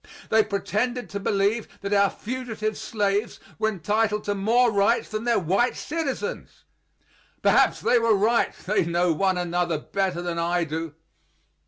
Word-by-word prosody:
They 220 0 +5
pretended 215 +4 -2
to 200 - -3
believe 200 +3 0
that 200 +1 -2
our 200 -1 +4
fugitive 220 -3 -4
slaves 205 0 -1 0.2
were 220 - +2
entitled 210 +3 0
to 205 - -1
more 230 +5 +3
rights 205 +3 +2
than 215 +1 -4
their 235 -1 +3
white 195 +8 +1
citizens; 330 - -4 0.8
perhaps - - +4
they 245 - +3
were 230 -2 +3
right, 220 +4 +2
they 205 +1 +2
know 170 +1 +1
one 190 +2 +1
another 175 -1 0
better 185 +2 -2
than 170 -1 -3
I 170 +1 +1
do. 160 -1 -5
205 Hz, 150 wpm, -25 LUFS, 180-225 Hz, 0.8 s, They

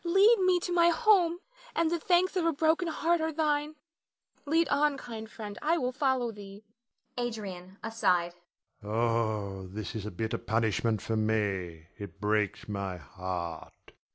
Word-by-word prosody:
Lead 390 +7 +5
me 370 -1 +4
to 355 - -3
my 340 -1 +5
home, 355 -3 +3 0.3
and 335 -5 +2
the 340 - 0
thanks 360 +3 +2
of 365 - +1
a 330 - +3
broken 320 +3 +2
heart 330 +1 +1
are 320 0 0
thine. 300 -1 0 0.7
Lead 325 +3 +3
on, 285 0 +2
kind 220 -4 -7
friend, 210 -2 -8
I 320 +3 +2
will 255 -4 -1
follow 260 -3 0
thee. 200 -1 -11 0.6
Adrian 195 -6 -5
[aside]. 180 -6 +1 0.5
Oh, 110 -3 -1
this 105 +3 -6
is 110 -2 -4
a - - -2
bitter 110 +5 -3
punishment 110 -1 0
for 115 - -1
me. 100 -7 -1
It 100 -1 -8
breaks 105 0 0
my 100 -3 -3
heart. 90 -1 -6
210 Hz, 155 wpm, -30 LUFS, -, 0.7 s, Lead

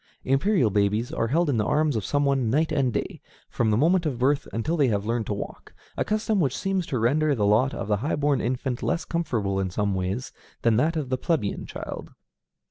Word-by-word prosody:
Imperial 135 - +2
babies 105 +3 +1
are 115 - 0
held 165 +7 +2
in 140 -5 +1
the 105 - +2
arms 150 +4 +1
of 110 - -1
some 145 +6 0
one 135 -4 +1
night 155 +7 +1
and 135 -4 +1
day, - - -4 0.3
from 115 -2 +1
the 105 - +2
moment 170 +7 +3
of 135 -5 -2
birth 140 +4 +1
until 115 +9 -1
they 145 -5 +3
have 100 -3 0
learned 115 -1 -1
to - - -1
walk, 100 - -8 0.2
a - - 0
custom 215 -1 0
which 140 -6 +1
seems 195 -3 -1
to 130 - -2
render 145 +6 +2
the 105 -4 +1
lot 110 +6 +3
of - - -4
the 105 -1 +1
high 135 +9 -1
born 145 -2 +1
infant 125 +1 -2
less 170 - -1
comfortable 110 - -1
in 95 -1 -1
some 100 +2 -1
ways 95 +7 -3 0.3
than 115 -2 +4
that 155 +9 +2
of 145 -5 -3
the 130 -1 -1
plebeian 150 - -1
child. - - -7
130 Hz, 225 wpm, -25 LUFS, 110-155 Hz, 0.3 s, than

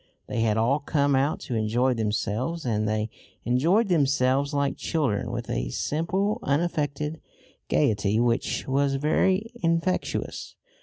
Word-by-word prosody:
They 120 - -3
had 110 -1 +2
all 125 +6 +2
come 140 -1 +1
out 140 +3 +1
to 125 - -5
enjoy 115 +4 +1
themselves, 115 +7 -2
and 110 -3 0
they 110 0 -1 0.3
enjoyed 165 - +2
themselves 140 -4 +2
like 140 -1 0
children, 120 -9 -1
with 120 0 -4
a - - -2
simple 185 - -1
unaffected 150 0 -1 0.5
gaiety 100 +5 +2
which 120 +1 0
was 135 +1 +1
very 185 - +1
infectious. 165 +2 -1
135 Hz, 125 wpm, -26 LUFS, 115-155 Hz, 0.5 s, had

